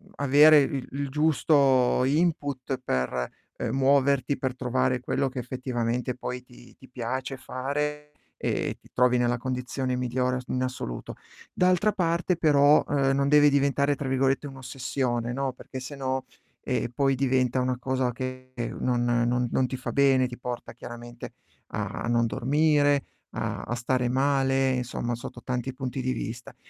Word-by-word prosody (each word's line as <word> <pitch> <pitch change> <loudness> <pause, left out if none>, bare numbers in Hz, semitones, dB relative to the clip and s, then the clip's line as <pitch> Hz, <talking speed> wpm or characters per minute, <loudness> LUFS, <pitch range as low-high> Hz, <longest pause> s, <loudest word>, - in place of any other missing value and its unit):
avere 145 +2 +7
il 135 -1 -2
il 140 0 -3
giusto 140 -4 +3
input 140 -3 0
per, 65 - -1 0.3
ehm, - - -2
muoverti, 140 0 +3
per 130 -1 -2
trovare 125 0 0
quello 135 +2 0
che 130 -1 -5
effettivamente 125 -1 -2
poi 125 0 -5
ti 125 -1 -17
ti 130 - -16
piace 130 +2 -4
fare 150 +3 -3 0.3
e - - -2
ti - - -21
trovi 125 0 +3
nella 120 0 +1
condizione 130 +1 -3
migliore 125 0 0
as 125 - -6
in 130 0 -1
assoluto. 125 - -5 0.4
D'altra 185 +3 +3
parte 170 -1 0
però, 145 -2 +5
ehm, 135 -2 +2
non 140 0 +1
devi 150 0 +6
diventare 140 0 +2
tra 135 - -4
virgolette 135 +2 +1
"un'ossessione", 130 -2 -3
no, 135 0 -1
perché 130 +1 -9
sennò, 130 -1 -3 0.4
ehm, - - -1
poi 135 -1 +2
diventa 130 -1 +1
una 125 0 0
cosa 130 0 -1
che 130 +1 -6 0.3
non 120 -1 +1
non 120 0 +1
non 130 - +2
ti 130 - -4
fa 130 - -5
bene, 135 -2 +4
ti 120 0 -9
porta 125 -1 -6
chiaramente 120 0 -9 0.4
a - - -3
non 120 0 +2
dormire, 145 +5 +2 0.3
a - - -3
a 120 - -3
stare 125 +1 0
male, 135 0 +2
insomma 125 -1 -2
sotto 120 +1 -9
tanti 125 +1 -3
punti 130 0 -4
di 130 0 -1
vista. 115 0 -6
130 Hz, 155 wpm, -26 LUFS, 125-140 Hz, 0.4 s, avere